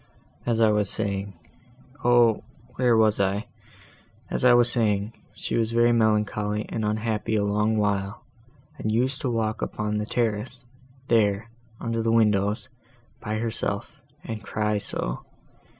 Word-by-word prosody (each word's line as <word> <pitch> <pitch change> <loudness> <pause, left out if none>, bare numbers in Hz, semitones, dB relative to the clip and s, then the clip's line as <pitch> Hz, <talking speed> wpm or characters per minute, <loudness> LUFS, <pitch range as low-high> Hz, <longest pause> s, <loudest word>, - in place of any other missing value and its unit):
"As 115 -1 +1
I 110 -1 +5
was 105 -2 +2
saying—O, 120 - 0 0.3
where 125 -3 +3
was 110 -2 +3
I?—as 100 +5 -5
I 125 - +7
was 120 0 +5
saying—she 110 -2 -2
was 115 -1 0
very 120 0 +4
melancholy 105 -2 +1
and 110 - -3
unhappy 110 +1 -1
a 105 - +2
long 105 +2 +1
while, 100 -1 -1 0.5
and 110 - -1
used 125 +6 0
to 135 - -1
walk 110 -2 -1
about - - -4
upon 105 0 -1
the 105 - -3
terrace, 120 +2 -2 0.4
there, 110 -1 +2 0.3
under 115 0 -2
the 115 0 +1
windows, 105 -1 +2 0.5
by 110 -2 -4
herself, 115 0 -3 0.2
and 110 -1 -6
cry 105 -1 -1
so! - - -4
110 Hz, 135 wpm, -25 LUFS, 105-115 Hz, 0.5 s, I